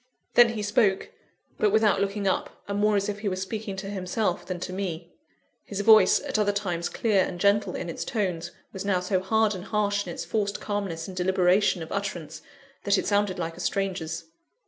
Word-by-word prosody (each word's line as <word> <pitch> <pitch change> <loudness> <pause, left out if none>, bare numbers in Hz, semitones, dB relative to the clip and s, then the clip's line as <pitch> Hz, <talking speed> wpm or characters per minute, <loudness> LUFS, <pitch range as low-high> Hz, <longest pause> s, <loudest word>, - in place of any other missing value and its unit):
Then 240 -1 +6
he 215 -2 -3
spoke; 205 -2 +1 0.5
but 210 - +3
without 210 -2 +3
looking 200 0 -1
up, 190 - -2
and 200 0 -2
more 210 0 +3
as 200 0 +1
if 205 0 -3
he 205 -1 -1
were 185 - -2
speaking 195 +2 -4
to 195 +1 -6
himself 190 0 -1
than 185 -1 -5
to 185 - -4
me. 175 -3 -4 0.5
His 200 -1 -4
voice, 215 +1 +6
at - - -2
other 205 -1 +3
times 175 -4 -2
clear 205 -5 +2
and 175 -1 -5
gentle 205 +2 +2
in 180 - -4
its 170 - -4
tones, 180 -6 -2 0.2
was 190 - -5
now 200 -2 +1
so 185 +1 0
hard 220 +3 +2
and 185 -1 -7
harsh 205 -1 0
in - - -4
its - - -5
forced 205 -2 -1
calmness 195 -6 -3
and 190 - -8
deliberation 185 0 +2
of 160 - -10
utterance, 195 -6 -4 0.4
that 200 - +3
it - - -1
sounded 205 -2 +1
like 165 -1 -3
a - - -12
stranger's. 180 -4 -2
195 Hz, 205 wpm, -26 LUFS, 180-205 Hz, 0.5 s, Then